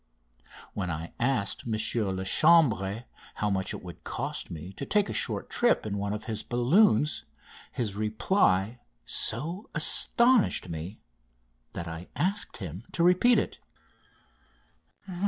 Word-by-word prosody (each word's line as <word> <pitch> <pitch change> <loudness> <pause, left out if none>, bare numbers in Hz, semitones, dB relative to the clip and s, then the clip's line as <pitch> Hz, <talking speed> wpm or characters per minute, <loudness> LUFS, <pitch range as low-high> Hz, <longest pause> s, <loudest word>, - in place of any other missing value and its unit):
When 90 -3 -3
I 80 +1 -5
asked 120 -5 0
M. 115 - -2
Lachambre 110 - +2 0.3
how 105 -1 -1
much 95 -1 -1
it - - -7
would 90 -2 -11
cost - - -4
me 85 +4 -8
to 120 - -7
take 205 +6 +1
a - - -3
short - - 0
trip 240 - +1
in 105 -2 -3
one 100 0 -3
of 105 +1 -4
his 110 -2 -3
balloons 140 - +2 0.5
his 110 -5 -3
reply 110 - +1 0.3
so 165 - +1
astonished 235 - +3
me 85 +5 -7 0.7
that 85 - -6
I 80 +2 -7
asked 190 +8 -1
him 95 0 -7
to 170 - 0
repeat 180 +8 +4
it. - - -2
110 Hz, 130 wpm, -28 LUFS, -, 0.7 s, repeat